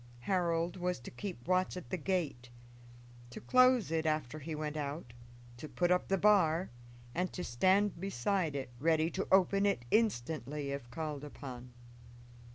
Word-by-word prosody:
Harold 170 +2 0
was 180 -3 -1
to 120 - -10
keep 130 -1 -7
watch 185 0 +1
at 145 -10 -9
the - - +1
gate, 155 -8 -2 0.8
to 120 - -8
close 255 - +4
it 160 -1 0
after 155 -2 -1
he 155 +2 -5
went 150 0 -4
out, 145 -3 -4 0.4
to 155 +5 -8
put 175 0 +1
up 180 - +2
the 195 - +2
bar, 185 -4 +3 0.4
and 180 +2 -1
to 180 - -5
stand 190 +10 +2
beside 190 -2 -1
it 135 -3 -4
ready 160 +2 +2
to - - -3
open 195 +1 +4
it 200 -12 +1
instantly 150 - 0
if 140 -4 -5
called 150 +1 -4
upon. 125 -4 -8
160 Hz, 160 wpm, -33 LUFS, 140-185 Hz, 0.8 s, close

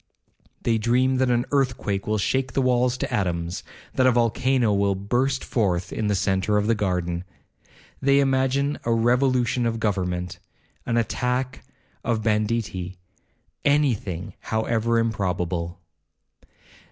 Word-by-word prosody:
They 115 -1 +2
dream 125 +4 +2
that 130 0 +2
an 120 0 +2
earthquake 125 -8 0
will 110 0 +1
shake 130 +4 0
the 135 - +1
walls 125 0 +2
to - - -3
atoms, 85 -3 -1 0.3
that 130 - +3
a - - +6
volcano 120 0 +2
will 100 0 +2
burst 125 +7 0
forth 95 -6 0
in 110 - -1
the 105 - +2
centre 95 +2 +1
of 105 - +1
the 115 - +3
garden. 90 -4 -1 0.8
They 140 +1 +4
imagine 135 +1 +1
a 115 - 0
revolution 120 +1 +2
of 115 0 -2
government,—an 90 +2 -3
attack 125 +3 -1 0.4
of 115 -2 0
banditti,—any 105 - -1
thing, 90 -5 -6
however 115 +1 0
improbable. 90 -6 -1
115 Hz, 125 wpm, -24 LUFS, 95-125 Hz, 0.8 s, a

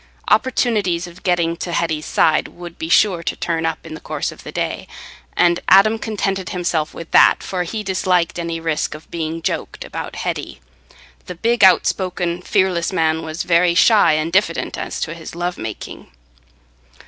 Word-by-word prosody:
Opportunities 215 -8 +1
of 175 +1 -13
getting 170 -2 +1
to 175 - -5
Hetty's 160 -2 -1
side 155 -1 +2
would 175 -1 -11
be 160 - -4
sure 180 -1 +4
to - - -3
turn 165 -1 -1
up 160 - -4
in 160 - -8
the 155 - -7
course - - -3
of - - -14
the - - -8
day, - - -3 0.5
and 175 0 +4
Adam 215 +4 +6
contented 195 -4 -2
himself 170 -4 -2
with 165 - -9
that - - +5
for 185 -2 -3
he 210 +5 -4
disliked 185 -3 0
any 165 -1 -3
risk 160 -2 -2
of 155 - -14
being 165 0 -4
"joked" - - -3
about - - -6
Hetty—the - - -8
big, 235 +7 +1
outspoken, 180 -2 +2
fearless 185 -2 +1
man 160 -3 +1
was 160 +1 -4
very 170 0 +3
shy 205 -4 +5
and 155 +2 -1
diffident 190 -4 +1
as - - -5
to 165 - -2
his 165 0 -9
love 175 +1 -3
making. 110 -2 -7
170 Hz, 170 wpm, -19 LUFS, 160-185 Hz, 0.5 s, Adam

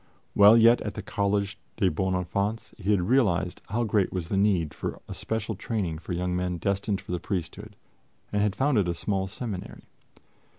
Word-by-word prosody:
While 105 +3 +8
yet 115 +1 +6
at 105 - -4
the 105 - -5
Collège 100 0 -1 0.2
des 100 -4 +3
Bons 95 +4 0
Enfants, 100 +5 -2
he 100 0 -3
had 100 -3 +4
realized 90 -6 +1
how 115 +4 0
great 105 -3 +1
was 90 -3 -4
the - - 0
need 95 -6 +2
of - - -3
a - - -6
special 110 0 -3
training 95 -6 -3
for 90 - -5
young 90 +1 -1
men 90 -1 -1
destined 100 +2 -1
for - - -9
the 90 - -1
priesthood 90 -1 -5 0.6
and 105 - +2
had 105 -1 +1
founded 130 -9 +2
a 85 - -1
small 95 +1 -1
seminary. 100 -2 -6
100 Hz, 185 wpm, -27 LUFS, 90-105 Hz, 0.6 s, While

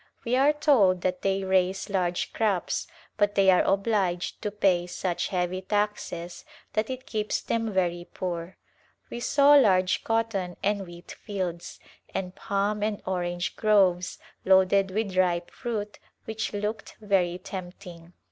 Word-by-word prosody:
We 240 +2 +1
are 275 +3 +5
told 250 - +3
that 180 0 -1
they 195 0 0
raise 190 0 +1
large 180 -3 -1
crops 205 -6 0 0.3
but 205 -1 +2
they 195 -1 +5
are 180 - +5
obliged 195 -3 0
to 210 - -1
pay 190 -4 +1
such 180 0 -2
heavy 180 0 -2
taxes 200 -4 -3 0.3
that 215 +2 0
it 260 0 -5
keeps 215 -2 -2
them 225 -1 -2
very 175 -2 -1
poor. 175 -1 -5 0.5
We 235 - -4
saw 280 +3 +5
large 185 -10 +4
cotton 225 -6 -1
and 200 -1 0
wheat 175 0 -11
fields, 185 -5 -5 0.4
and 180 -1 -3
palm 205 +2 -1
and 210 -1 -1
orange 175 -1 -2
groves 190 -5 +2 0.3
loaded 190 +1 +4
with 200 -1 -2
ripe 175 -2 +1
fruit 215 -4 -5 0.3
which 220 0 -3
looked 210 +2 -4
very 190 -4 +1
tempting. 180 -2 -9
195 Hz, 140 wpm, -27 LUFS, 180-210 Hz, 0.5 s, are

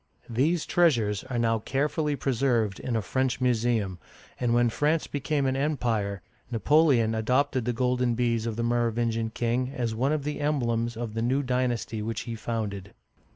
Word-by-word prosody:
These 150 +8 +1
treasures 115 - +2
are 130 -2 -4
now 115 -1 +2
carefully 150 +5 -1
preserved 120 -7 0
in 125 - -3
a 110 - 0
French 130 +3 0
museum, 115 -6 +1 0.4
and 120 -1 +1
when 120 0 +4
France 150 +6 +1
became 145 0 -1
an 130 0 +1
Empire, 115 - -1 0.3
Napoleon 125 -2 +3
adopted 125 +3 +1
the 125 - +1
golden 125 0 +1
bees 115 -1 0
of 115 - -2
the 115 - -2
Merovingian 115 -1 0
king 120 +3 -1
as 120 -4 -2
one 130 +6 0
of 155 -2 0
the 150 +1 -3
emblems 120 -6 0
of 115 -2 -4
the 115 - -2
new 130 +4 +1
dynasty 125 -3 -1
which 110 0 -3
he 115 - -5
founded. 105 -4 -4
120 Hz, 165 wpm, -27 LUFS, 115-135 Hz, 0.4 s, when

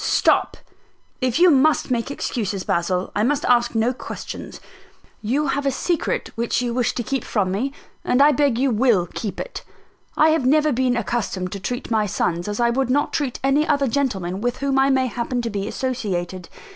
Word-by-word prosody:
"Stop! - - +2 0.6
If 255 -1 +1
you 355 +1 +6
must 285 0 +3
make 235 +1 0
excuses, 210 -8 -3
Basil, 180 +2 -1
I 205 - +1
must 280 +6 +1
ask 240 -1 +3
no 225 +3 +2
questions. - - -8 0.6
You 270 +7 0
have 285 - -1
a - - +3
secret 335 +5 -1
which 235 0 -1
you 245 -1 -2
wish 245 -1 0
to 240 - -2
keep 270 +3 -2
from 195 -4 -1
me; 240 +9 -1 0.3
and 250 - +1
I 290 +2 +7
beg 280 -4 +2
you 265 +1 +2
will 220 -5 +3
keep 200 +4 -6
it. - - -6 0.5
I 310 - +5
have 315 -3 +2
never 300 +4 +3
been 250 -1 +1
accustomed 200 -5 -2
to 200 - -5
treat 245 +5 -4
my 215 -2 +2
sons 175 -1 -1
as 210 +2 -3
I 235 0 +3
would 260 +1 0
not 285 +3 +1
treat 275 -5 -2
any 280 +3 +2
other 285 -2 +2
gentlemen 205 -9 -1
with 245 +2 -1
whom 275 -1 0
I 270 +1 +4
may 265 -1 +3
happen 245 0 -2
to 230 - -3
be 200 0 -3
associated. 190 -9 -3
245 Hz, 195 wpm, -22 LUFS, 210-275 Hz, 0.6 s, I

